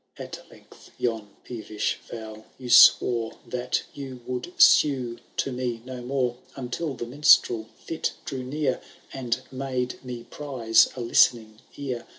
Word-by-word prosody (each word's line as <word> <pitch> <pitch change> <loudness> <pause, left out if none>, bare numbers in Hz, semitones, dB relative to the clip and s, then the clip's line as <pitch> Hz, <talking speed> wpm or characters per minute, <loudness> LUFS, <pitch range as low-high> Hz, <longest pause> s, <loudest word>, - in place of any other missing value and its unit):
At - - -8
length - - -18
yon 110 -3 -2
peevish 110 -3 -3
vow 110 -1 -8
you 125 -2 -6
swore, 120 -1 +6
That 125 0 -2
you 130 -3 -8
would 125 +6 -4
sue 125 -5 +5 0.2
to 135 - 0
me 125 -2 -3
no 130 -1 -7
more.* 125 -1 -1 0.2
Until 135 +3 -4
the 120 - -5
minstrel 120 -4 +4
fit 165 - -3
drew 130 - -4
near. 130 0 -2 0.3
And 125 -1 -2
made 130 -1 -3
me 125 -2 -7
prize 125 -7 +2
a 125 - -5
listening 115 -2 +3 0.2
ear. 130 -4 -5
125 Hz, 140 wpm, -25 LUFS, 115-130 Hz, 0.3 s, swore